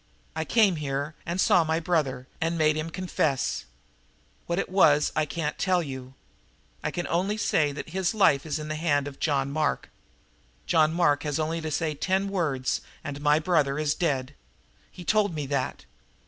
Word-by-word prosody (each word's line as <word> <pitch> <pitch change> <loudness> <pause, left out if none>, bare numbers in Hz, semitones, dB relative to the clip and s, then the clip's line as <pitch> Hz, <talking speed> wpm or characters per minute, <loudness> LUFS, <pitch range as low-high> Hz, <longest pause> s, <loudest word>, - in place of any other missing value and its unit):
I 160 0 -2
came 205 -5 +3
here, 145 +1 -3
and 170 +2 -2
saw 180 -2 +5
my 160 0 0
brother 150 -7 0 0.2
and 165 +1 0
made 155 -1 +3
him 155 +1 -3
confess. 160 - -1 0.8
What 170 - -1
it - - 0
was 150 -6 +4
I 155 - +1
can't 150 0 -3
tell 185 -2 +2
you. 130 -2 -8 0.7
I - - 0
can 175 - -3
only 190 +5 0
say 155 -8 +2
that 150 - -7
his 190 +4 -1
life 150 -10 +4
is 155 -2 -2
in 150 0 -6
the 155 0 -3
hand 145 -4 +1
of 140 - -9
John 140 -3 0
Mark. 155 +1 -1 0.7
John 155 -2 +3
Mark 160 -4 +2
has 150 -2 -2
only 160 +1 -1
to 160 - -3
say 155 +1 -1
ten 190 +6 0
words, 150 -10 -1 0.2
and 145 0 -6
my 150 0 +4
brother 155 -4 +1
is 150 -1 +1
dead. 140 -5 -1 0.6
He 180 - -11
told 205 -4 +2
me 150 -2 -3
that. 135 -1 -2
155 Hz, 180 wpm, -27 LUFS, 145-175 Hz, 0.8 s, saw